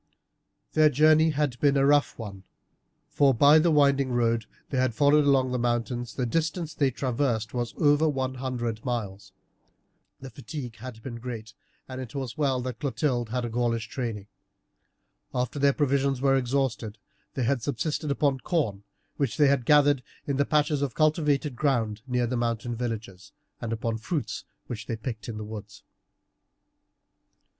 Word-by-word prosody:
Their 155 -1 +5
journey 155 +3 +5
had 145 -5 -1
been 140 -1 +3
a 135 - +4
rough 145 0 +3
one, 100 -4 -7 0.7
for, 145 -3 +3
by 145 +6 +7
the 170 +2 +3
winding 140 -3 +3
road 115 -2 +1 0.2
they 130 - 0
had 130 -3 +1
followed 145 +3 +4
along 135 -2 +3
the 125 - -1
mountains, 120 0 -1
the 125 - -1
distance 160 +4 -1
they 140 -2 +2
traversed 120 -4 -1
was 120 -1 -3
over 150 +1 +4
one 130 -2 -2
hundred 120 -4 -3
miles. 105 -6 -4 0.9
The 135 -1 -9
fatigue 135 -4 -7
had 110 -1 -9
been 120 -3 -6
great, 115 -2 -7 0.3
and 130 0 -6
it 125 -1 -9
was 130 -4 -4
well 140 -4 +1
that 125 -2 -5
Clotilde 125 -3 -1
had 125 +1 -2
had - - -1
a - - -3
Gaulish 115 0 -1
training. 115 -6 -4 1.1
After 125 +3 -1
their 140 0 +5
provisions 140 -2 +1
were 135 0 +3
exhausted 125 -4 -1 0.4
they 130 - 0
had 125 +1 +1
subsisted 150 +4 -2
upon 140 -1 +1
corn 120 - -1 0.3
which 140 -5 -1
they 140 -2 +5
gathered 145 +1 +4 0.2
in 140 -2 -1
the 140 - +2
patches 150 -1 +1
of 135 -5 -2
cultivated 150 -3 +1
ground 115 -6 0
near 125 -1 +1
the 120 +2 -2
mountain 120 0 -1
villages, 110 -5 -5 0.3
and 115 - -4
upon 115 0 -2
fruits 145 +6 -3 0.2
which 115 -4 -7
they 115 - -2
picked 110 -1 -6
in 110 - -5
the 105 - -5
woods. 105 -1 -9
130 Hz, 165 wpm, -27 LUFS, 115-145 Hz, 1.1 s, by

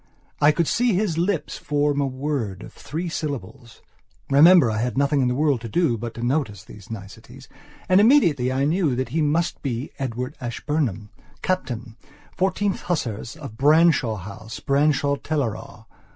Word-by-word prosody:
I 145 - +6
could 160 +1 0
see 245 -2 +2
his 185 -4 0
lips 180 -1 -1
form 145 -1 0
a 140 - +1
word 130 -7 -3
of - - -11
three 165 +4 -5
syllablesremember 140 - +1
I 110 - -1
had 125 +2 -2
nothing 140 0 +2
in 125 - +2
the 125 - 0
world 145 -4 +1
to 115 - -6
do 165 -3 +1
but 115 +1 -6
to 120 - -6
notice 120 - -1
these 100 -3 -13
nicetiesand 100 -3 -10 0.4
immediately 185 - +4
I 135 +2 +1
knew 155 -3 +1
that 130 -1 -2
he 160 +6 0
must 155 +3 0
be 130 -1 -3
Edward 125 +1 -4
Ashburnham, 120 - -2 0.3
Captain, 120 -11 -3 0.4
Fourteenth 190 +2 0
Hussars, 115 - -3
of 140 -9 -10
Branshaw 150 -4 +4
House, 110 +4 -8
Branshaw 140 0 +1
Teleragh. 115 -7 -4
140 Hz, 150 wpm, -23 LUFS, 115-155 Hz, 0.4 s, I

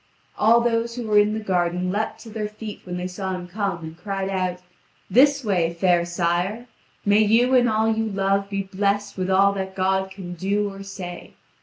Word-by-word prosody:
All 230 +2 +5
those 235 0 0
who 245 -2 -4
were 210 -1 +4
in 210 +1 +2
the - - -2
garden 180 -2 0
leaped 215 +3 -2
to 225 - -11
their 215 -1 -3
feet 210 0 -8
when 180 -1 -4
they 180 - -3
saw 190 +1 -4
him 180 -1 -7
come, 190 -3 -3
and 160 0 -8
cried 195 +1 -3
out: 185 -2 -1 0.5
"This 280 +5 +5
way, 170 -5 +1
fair 175 -1 +3
sire. 175 +6 -1 0.4
May 205 +1 +4
you 230 +4 +4
and 245 -2 +5
all 220 0 +2
you 225 0 +1
love 195 -1 0
be 195 -1 -2
blessed 200 +2 -1
with 185 0 -2
all 195 +1 +4
that 190 -1 -4
God 190 0 +1
can 190 -2 -8
do 200 +3 -1
or 195 - -9
say." 190 -3 -8
195 Hz, 200 wpm, -23 LUFS, 185-215 Hz, 0.5 s, All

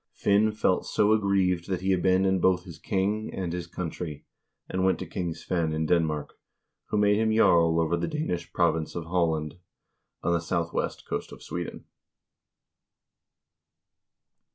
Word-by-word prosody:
Finn 105 +2 +3
felt 105 -3 +1
so 105 +1 +3
aggrieved 95 -4 +1
that 95 -2 -1
he 95 0 +2
abandoned 95 0 +2
both 90 -1 +3
his 85 -3 -11
king 105 +2 -1
and 90 -3 -3
his 90 -1 -4
country, 85 -3 -5 0.4
and 95 0 -1
went 95 0 +3
to 95 - -5
King 85 -1 -3
Svein 85 -3 -1
in 80 0 -1
Denmark, 80 -3 0 0.5
who 105 - -1
made 105 0 +4
him 110 0 +2
jarl 85 -7 +4
over 80 +1 +1
the 85 - -2
Danish 120 - -3
province 80 -3 0
of 85 - -3
Halland, 80 -2 -1 0.6
on 85 - +2
the 85 - +1
southwest 85 0 -2
coast - - -4
of - - -11
Sweden. - - -6
90 Hz, 150 wpm, -27 LUFS, 85-95 Hz, 0.6 s, made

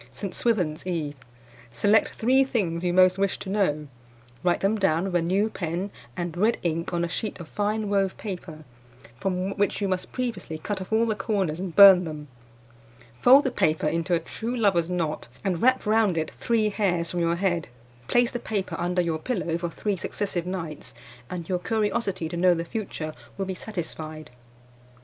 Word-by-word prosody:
"St. 180 +9 -6
Swithin's 180 -9 0
Eve. 160 -5 -2 0.6
Select 205 - +3
three 260 +4 +3
things 180 -10 -1
you 175 - +1
most 185 +1 +5
wish 195 -1 +1
to 190 - -6
know; 155 -8 0 0.6
write 175 -1 +2
them 200 +3 +2
down 185 -5 +2
with 195 -1 -3
a 175 - +4
new 190 +5 +2
pen 180 0 -3 0.3
and 175 -2 -3
red 215 +6 +2
ink 165 0 -1
on 170 -1 0
a - - -2
sheet 210 +5 -4
of 170 - -8
fine 210 +2 -1
wove 195 -2 +1
paper, 175 -6 -7 0.6
from 190 +3 -1
which 205 0 +1
you 200 - 0
must 185 -1 -2
previously 235 -10 -3
cut 190 +4 -4
off 185 - -8
all 220 +1 +3
the 225 - +1
corners 195 -6 -1
and 185 -3 -5
burn 195 -3 +10
them. 150 -2 -7 0.9
Fold 270 +3 +8
the 265 - 0
paper 155 -9 +1
into 165 +3 +1
a - - +1
true 230 +8 -4
lover's 185 -7 +2
knot, 165 -7 -2 0.2
and 180 -4 -1
wrap 255 0 +3
round 215 -4 +3
it 160 - -1
three 225 -2 +1
hairs 180 -5 0
from 175 - -2
your 170 0 +2
head. 175 -3 0 0.4
Place 240 -1 +3
the 240 - -3
paper 200 -7 -3
under 180 +1 +1
your 165 -2 -1
pillow 180 -5 -2
for 170 0 -2
three 200 +3 -2
successive 180 -1 -3
nights, 165 -5 -5 0.3
and 175 -2 -5
your 180 -2 0
curiosity 205 -2 -1
to 165 - -5
know 180 +1 +4
the 165 0 -3
future 165 -6 -4 0.2
will 195 - -1
be 190 - -3
satisfied. 155 - -6
185 Hz, 185 wpm, -26 LUFS, 170-210 Hz, 0.9 s, burn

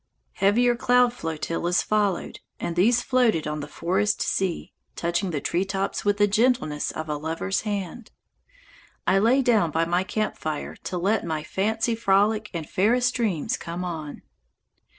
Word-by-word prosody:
Heavier 240 +5 +3
cloud 245 0 +3
flotillas 165 -1 -1
followed, 205 -4 0 0.2
and 170 - -3
these 230 +7 +3
floated 245 - +2
on 150 0 -3
the 145 - -6
forest 195 +7 0
sea, 190 -3 -1 0.2
touching 170 +3 -1
the 155 -4 -2
treetops 190 +5 -1
with 205 0 +1
the 205 - +5
gentleness 205 - +1
of 155 - -5
a 150 -1 -2
lover's 165 +5 -2
hand. 205 +1 -4 1.0
I 195 - +4
lay 250 +6 +3
down 220 -9 +3
by 160 +2 +1
my 175 +2 +1
camp 215 +2 -2
fire 155 -1 -4
to 180 - -3
let 200 +5 +1
my 160 -2 -3
fancy 220 +6 0
frolic, 215 0 +2
and 165 -4 -5
fairest 245 +6 +2
dreams 220 - -1
came 170 +2 -5
on. 155 -4 -6
195 Hz, 150 wpm, -25 LUFS, 170-220 Hz, 1.0 s, the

